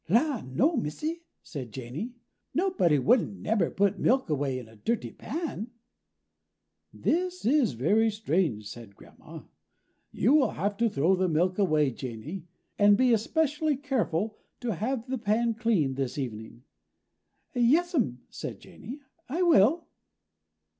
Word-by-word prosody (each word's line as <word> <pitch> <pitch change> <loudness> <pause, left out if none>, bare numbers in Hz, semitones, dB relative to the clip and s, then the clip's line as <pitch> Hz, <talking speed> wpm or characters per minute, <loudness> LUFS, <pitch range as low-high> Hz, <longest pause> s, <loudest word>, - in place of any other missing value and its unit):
"La, 250 - +2
no, 205 - +1
Missy," 300 - -3 0.2
said 130 -7 -7
Janey, 135 - -6 0.4
"nobody 355 - +2
wouldn't 205 - +2
nebber 220 -2 +1
put 200 -1 +1
milk 260 -8 +2
away 140 -3 0
in 125 -3 -8
a 110 - -17
dirty 230 - -2
pan." 295 - -5 1.2
"This 355 - -1
is 265 -1 +3
very 205 - +3
strange," 170 - -1
said 105 -2 -10
Grandma. - - -13 0.7
"You 235 +9 +2
will 280 -7 +5
have 200 +5 -2
to 230 +1 +2
throw 170 +2 +2
the 185 0 +1
milk 180 +5 +1
away, 155 -7 +3
Janey, 130 - -7 0.3
and 205 0 +6
be 255 0 +4
especially 300 +5 +1
careful 225 - -1 0.2
to 240 -3 -1
have 225 +6 -2
the 260 -1 -2
pan 230 +2 +1
clean 215 - +1
this 135 -1 -3
evening." 115 -2 -6 0.9
"Yes'm," 250 - +2
said - - -6
Janey, 265 +6 -10 0.3
"I 335 +7 0
will." 325 - +4
210 Hz, 135 wpm, -28 LUFS, -, 1.2 s, and